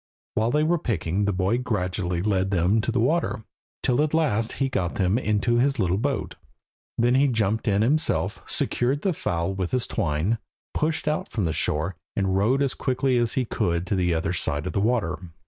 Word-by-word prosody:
While 110 Hz, +1 st, +1 dB
they 150 Hz, +4 st, +2 dB
were 170 Hz, +2 st, +2 dB
picking 100 Hz, -, -1 dB
the 100 Hz, -, +1 dB
boy 95 Hz, +5 st, +1 dB
gradually 90 Hz, -6 st, -2 dB
led 95 Hz, -2 st, +1 dB
them 95 Hz, +3 st, +2 dB
to 120 Hz, -, -1 dB
the 120 Hz, -, 0 dB
water, 130 Hz, -1 st, +1 dB, 0.4 s
till 125 Hz, +3 st, +2 dB
at 155 Hz, +1 st, +1 dB
last 115 Hz, -9 st, +1 dB
he 135 Hz, -, 0 dB
got 90 Hz, -10 st, -2 dB
them 95 Hz, +4 st, +2 dB
into 110 Hz, +1 st, +1 dB
his 135 Hz, +3 st, +2 dB
little 95 Hz, -2 st, +1 dB
boat. 140 Hz, +3 st, -2 dB, 0.6 s
Then 120 Hz, +1 st, +3 dB
he 135 Hz, +2 st, +4 dB
jumped 110 Hz, -2 st, 0 dB
in 100 Hz, 0 st, +3 dB
himself, 150 Hz, +7 st, +1 dB
secured 135 Hz, +4 st, 0 dB
the 190 Hz, -, +1 dB
fowl 85 Hz, -, -2 dB
with 95 Hz, -2 st, -2 dB
his 125 Hz, -2 st, 0 dB
twine, 95 Hz, +3 st, -1 dB, 0.3 s
pushed 155 Hz, 0 st, -1 dB
out 150 Hz, +1 st, -1 dB
from 105 Hz, -6 st, -1 dB
the 80 Hz, -, 0 dB
shore, 80 Hz, +6 st, -1 dB, 0.2 s
and 95 Hz, -2 st, 0 dB
rowed 120 Hz, +8 st, +2 dB
as 135 Hz, -, 0 dB
quickly 130 Hz, -1 st, 0 dB
as 120 Hz, -1 st, +1 dB
he 130 Hz, -, 0 dB
could 85 Hz, -5 st, -1 dB
to 95 Hz, -, -1 dB
the 90 Hz, -2 st, +1 dB
other 85 Hz, +1 st, 0 dB
side 75 Hz, -3 st, 0 dB
of 95 Hz, -, -3 dB
the 100 Hz, -, +1 dB
water. 110 Hz, -6 st, 0 dB
110 Hz, 200 wpm, -25 LUFS, 95-130 Hz, 0.6 s, he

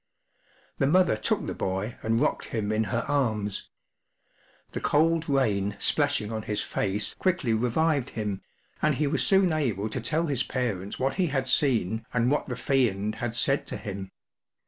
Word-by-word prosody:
The 135 Hz, -, +3 dB
mother 180 Hz, -2 st, +4 dB
took 110 Hz, -, 0 dB
the -, -, -3 dB
boy 95 Hz, +5 st, -3 dB
and 115 Hz, +1 st, +1 dB
rocked 150 Hz, -, 0 dB
him 110 Hz, -2 st, -2 dB
in 110 Hz, +1 st, +1 dB
her 115 Hz, +3 st, -2 dB
arms. 110 Hz, -8 st, -1 dB, 1.0 s
The -, -, -4 dB
cold 160 Hz, +1 st, +2 dB
rain 105 Hz, -8 st, +1 dB
splashing 145 Hz, -8 st, +1 dB
on 110 Hz, -, -2 dB
his 105 Hz, -1 st, -3 dB
face 105 Hz, +2 st, -1 dB
quickly 185 Hz, -11 st, 0 dB
revived 130 Hz, +4 st, +1 dB
him, 105 Hz, -3 st, -4 dB, 0.4 s
and 150 Hz, -2 st, +2 dB
he 150 Hz, -, 0 dB
was 140 Hz, -3 st, +1 dB
soon 190 Hz, +4 st, +4 dB
able 110 Hz, -9 st, -1 dB
to 125 Hz, -, -3 dB
tell 155 Hz, +8 st, +1 dB
his 140 Hz, -6 st, 0 dB
parents 105 Hz, -7 st, -2 dB
what 135 Hz, +5 st, -1 dB
he 180 Hz, -, +2 dB
had 135 Hz, -3 st, -1 dB
seen 115 Hz, -6 st, +2 dB
and 120 Hz, +2 st, +2 dB
what 145 Hz, -, 0 dB
the 125 Hz, -, -3 dB
Fiend 110 Hz, -6 st, +1 dB
had 120 Hz, -1 st, -4 dB
said 135 Hz, +3 st, +2 dB
to -, -, -4 dB
him. 95 Hz, -2 st, -6 dB
120 Hz, 170 wpm, -27 LUFS, 105-145 Hz, 1.0 s, mother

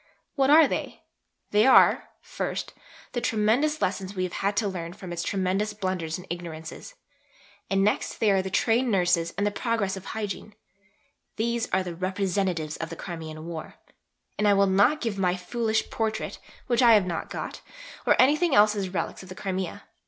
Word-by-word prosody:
What 270 Hz, -2 st, +2 dB
are 310 Hz, 0 st, +8 dB
they? -, -, -4 dB, 0.5 s
They 210 Hz, +4 st, +4 dB
are, 265 Hz, -, +6 dB
first, -, -, -4 dB, 0.4 s
the 240 Hz, -, -2 dB
tremendous 245 Hz, +7 st, +1 dB
lessons 190 Hz, +1 st, -2 dB
we 185 Hz, -, -1 dB
have 180 Hz, -, -3 dB
had 200 Hz, +1 st, 0 dB
to 215 Hz, -, +2 dB
learn 175 Hz, -3 st, -5 dB
from 180 Hz, -2 st, -8 dB
its 170 Hz, -, -3 dB
tremendous 195 Hz, +3 st, -1 dB
blunders 185 Hz, -5 st, -3 dB
and 180 Hz, -, -11 dB
ignorances. 170 Hz, -, -7 dB, 0.7 s
And 195 Hz, 0 st, +2 dB
next 210 Hz, -, 0 dB
they 215 Hz, -2 st, +3 dB
are 195 Hz, -1 st, +3 dB
Trained 225 Hz, +6 st, +1 dB
Nurses 175 Hz, -4 st, +2 dB
and 200 Hz, -, +1 dB
the 205 Hz, -, +1 dB
progress 220 Hz, -4 st, -1 dB
of 190 Hz, -, -9 dB
Hygiene. 210 Hz, -1 st, -5 dB, 0.8 s
These 235 Hz, +1 st, -1 dB
are 190 Hz, 0 st, +1 dB
the 175 Hz, -2 st, -5 dB
'representations' 185 Hz, -3 st, -1 dB
of 165 Hz, -, -5 dB
the 165 Hz, -, -6 dB
Crimean 160 Hz, -3 st, -7 dB
War. 165 Hz, -2 st, -7 dB, 0.6 s
And 210 Hz, -, +3 dB
I 205 Hz, -, +5 dB
will 200 Hz, 0 st, +4 dB
not 200 Hz, +11 st, +3 dB
give 220 Hz, -4 st, -2 dB
my 180 Hz, -1 st, +2 dB
foolish 220 Hz, +4 st, -1 dB
Portrait 220 Hz, -1 st, -2 dB, 0.3 s
(which 240 Hz, -1 st, +2 dB
I 235 Hz, -2 st, +7 dB
have 205 Hz, -3 st, +4 dB
not 170 Hz, -2 st, -4 dB
got) -, -, -6 dB, 0.5 s
or -, -, +4 dB
anything 300 Hz, +4 st, +4 dB
else 210 Hz, +1 st, +6 dB
as 195 Hz, -2 st, -2 dB
'relics' 180 Hz, -, -3 dB
of 185 Hz, -, -13 dB
the 185 Hz, -, -8 dB
Crimea. 190 Hz, -2 st, -4 dB
195 Hz, 180 wpm, -26 LUFS, 180-220 Hz, 0.8 s, are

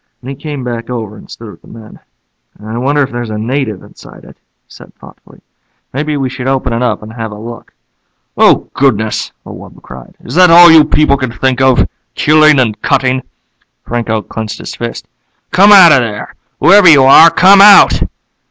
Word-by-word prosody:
Then 130 Hz, -, -8 dB
he -, -, -8 dB
came 145 Hz, -2 st, -8 dB
back 120 Hz, -1 st, -7 dB
over 110 Hz, -4 st, -7 dB
and -, -, -17 dB
stood 115 Hz, -2 st, -12 dB
with -, -, -19 dB
the -, -, -21 dB
men. 110 Hz, -1 st, -15 dB, 0.6 s
"I 110 Hz, +2 st, -9 dB
wonder 145 Hz, +3 st, -1 dB
if 135 Hz, -, -6 dB
there's 120 Hz, -1 st, -7 dB
a 105 Hz, -, -6 dB
native 110 Hz, -3 st, -5 dB
inside -, -, -17 dB
it," -, -, -17 dB
he -, -, -54 dB
said -, -, -18 dB
thoughtfully. -, -, -19 dB, 0.5 s
"Maybe 150 Hz, +2 st, -4 dB
we 135 Hz, -2 st, -3 dB
should 130 Hz, 0 st, -8 dB
open 130 Hz, -2 st, -3 dB
it 115 Hz, -, -3 dB
up 125 Hz, -3 st, -3 dB
and 110 Hz, +1 st, -12 dB
have 115 Hz, -1 st, -7 dB
a -, -, -10 dB
look." 115 Hz, +2 st, -12 dB, 0.6 s
"Oh, -, -, +1 dB
goodness!" 110 Hz, -6 st, -2 dB
the -, -, -12 dB
wub -, -, -14 dB
cried. 60 Hz, -1 st, -14 dB
"Is -, -, -10 dB
that 180 Hz, +1 st, +4 dB
all 170 Hz, 0 st, +7 dB
you 160 Hz, -2 st, +5 dB
people 150 Hz, -2 st, 0 dB
can 130 Hz, -3 st, -5 dB
think 130 Hz, +1 st, -3 dB
of, 130 Hz, -1 st, +1 dB, 0.3 s
killing 155 Hz, -1 st, +2 dB
and 110 Hz, -4 st, -2 dB
cutting?" 130 Hz, -1 st, -1 dB, 0.6 s
Franco 115 Hz, -2 st, -4 dB
clenched 110 Hz, -1 st, -8 dB
his -, -, -10 dB
fists. 120 Hz, 0 st, -8 dB, 0.4 s
"Come 200 Hz, +3 st, +3 dB
out 185 Hz, -5 st, +7 dB
of 135 Hz, -, +4 dB
there! 110 Hz, -4 st, -6 dB, 0.3 s
Whoever 200 Hz, -3 st, +4 dB
you 145 Hz, -4 st, +5 dB
are, 150 Hz, +5 st, +6 dB
come 190 Hz, +4 st, +4 dB
out!" 205 Hz, 0 st, +5 dB
130 Hz, 195 wpm, -10 LUFS, 115-150 Hz, 0.6 s, all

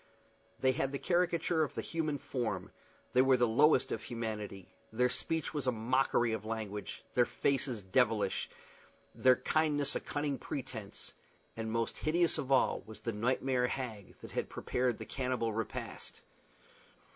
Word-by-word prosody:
They 130 Hz, -, +4 dB
had 135 Hz, 0 st, -1 dB
the 140 Hz, -, -2 dB
caricature 175 Hz, 0 st, +1 dB
of 150 Hz, -, -1 dB
the -, -, -2 dB
human 155 Hz, -3 st, -1 dB
form; 125 Hz, -4 st, -3 dB, 0.4 s
they 125 Hz, -, +6 dB
were 130 Hz, 0 st, +5 dB
the 120 Hz, -1 st, +4 dB
lowest 135 Hz, +3 st, +4 dB
of -, -, -2 dB
humanity; 110 Hz, -5 st, -5 dB, 0.2 s
their 125 Hz, +3 st, +2 dB
speech 160 Hz, +4 st, -1 dB
was 145 Hz, -4 st, -2 dB
a -, -, +5 dB
mockery 120 Hz, 0 st, +2 dB
of 110 Hz, -2 st, -3 dB
language; 110 Hz, -2 st, -5 dB
their 120 Hz, -, +5 dB
faces 130 Hz, -6 st, 0 dB
devilish, 95 Hz, -, +2 dB, 0.6 s
their 130 Hz, -1 st, +5 dB
kindness 150 Hz, 0 st, +1 dB
a -, -, +1 dB
cunning 145 Hz, -3 st, -2 dB
pretence; 115 Hz, -7 st, -6 dB, 0.4 s
and 110 Hz, -1 st, -3 dB
most 115 Hz, 0 st, -1 dB
hideous 170 Hz, +2 st, +2 dB
of 135 Hz, -, -4 dB
all 135 Hz, -, +4 dB
was 110 Hz, -, -10 dB
the 115 Hz, -, -2 dB
nightmare 125 Hz, +3 st, +1 dB
hag 115 Hz, -7 st, -5 dB
that -, -, -3 dB
prepared 125 Hz, -2 st, 0 dB
the 110 Hz, -, -7 dB
cannibal 125 Hz, -1 st, -1 dB
repast. 110 Hz, 0 st, -5 dB
125 Hz, 150 wpm, -33 LUFS, 110-140 Hz, 0.6 s, they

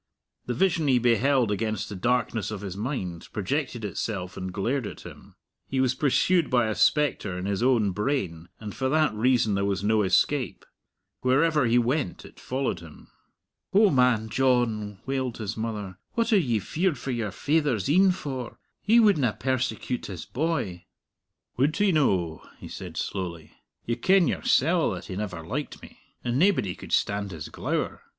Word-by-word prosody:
The 125 Hz, -, -1 dB
vision 170 Hz, 0 st, +2 dB
he 130 Hz, -2 st, +4 dB
beheld 120 Hz, 0 st, +3 dB
against 110 Hz, +1 st, -2 dB
the 105 Hz, -, -7 dB
darkness 120 Hz, +1 st, 0 dB
of 105 Hz, -3 st, -5 dB
his 95 Hz, -3 st, -5 dB
mind 100 Hz, -, -4 dB
projected 120 Hz, +2 st, -2 dB
itself 95 Hz, -1 st, -4 dB
and 95 Hz, 0 st, -5 dB
glared 115 Hz, +5 st, -1 dB
at -, -, -9 dB
him. -, -, -13 dB, 0.3 s
He 135 Hz, -, -2 dB
was 130 Hz, -1 st, +3 dB
pursued 155 Hz, +5 st, +2 dB
by 125 Hz, -3 st, +3 dB
a -, -, 0 dB
spectre 110 Hz, -9 st, +1 dB
in 90 Hz, -, -4 dB
his 100 Hz, +1 st, -1 dB
own 120 Hz, -5 st, +3 dB
brain, 95 Hz, -, -2 dB
and 105 Hz, -2 st, -7 dB
for 130 Hz, -1 st, -1 dB
that 155 Hz, -1 st, +2 dB
reason 115 Hz, -1 st, +2 dB
there 100 Hz, 0 st, 0 dB
was 100 Hz, -1 st, -1 dB
no 110 Hz, +1 st, +3 dB
escape. 95 Hz, -, +1 dB, 0.5 s
Wherever 145 Hz, +2 st, +3 dB
he 115 Hz, +1 st, +3 dB
went 120 Hz, -, 0 dB
it -, -, -15 dB
followed 130 Hz, -8 st, -2 dB
him. 80 Hz, -3 st, -14 dB, 0.6 s
"O 205 Hz, +1 st, +6 dB
man 125 Hz, -5 st, +3 dB
John," 115 Hz, -4 st, +1 dB
wailed 130 Hz, -3 st, -2 dB
his 110 Hz, -1 st, -4 dB
mother, 105 Hz, -4 st, -5 dB
"what 230 Hz, 0 st, +1 dB
are 205 Hz, -, +6 dB
ye 120 Hz, -10 st, +1 dB
feared 160 Hz, -, -1 dB
for 135 Hz, -, -4 dB
your 115 Hz, -4 st, -2 dB
faither's 140 Hz, -, 0 dB
een 190 Hz, +6 st, +5 dB
for? 135 Hz, -9 st, -5 dB, 0.2 s
He 225 Hz, +3 st, +5 dB
wouldna 155 Hz, -, +4 dB
persecute 130 Hz, -1 st, -2 dB
his 90 Hz, -5 st, -7 dB
boy." 120 Hz, -, -2 dB, 0.7 s
"Would 140 Hz, +5 st, +2 dB
he 205 Hz, -1 st, +3 dB
no?" 95 Hz, -, +1 dB, 0.2 s
he -, -, -10 dB
said -, -, -8 dB
slowly. 85 Hz, -5 st, -4 dB, 0.3 s
"You 120 Hz, +1 st, -1 dB
ken 185 Hz, +6 st, +4 dB
yoursell 165 Hz, +5 st, +2 dB
that -, -, -8 dB
he 95 Hz, -, -6 dB
never 90 Hz, -5 st, -5 dB
liked 140 Hz, -, -4 dB
me! -, -, -14 dB, 0.2 s
And 120 Hz, +2 st, 0 dB
naebody 175 Hz, -, +3 dB
could -, -, -11 dB
stand 100 Hz, 0 st, +1 dB
his 80 Hz, -5 st, -7 dB
glower. -, -, -3 dB
120 Hz, 170 wpm, -26 LUFS, 100-140 Hz, 0.7 s, O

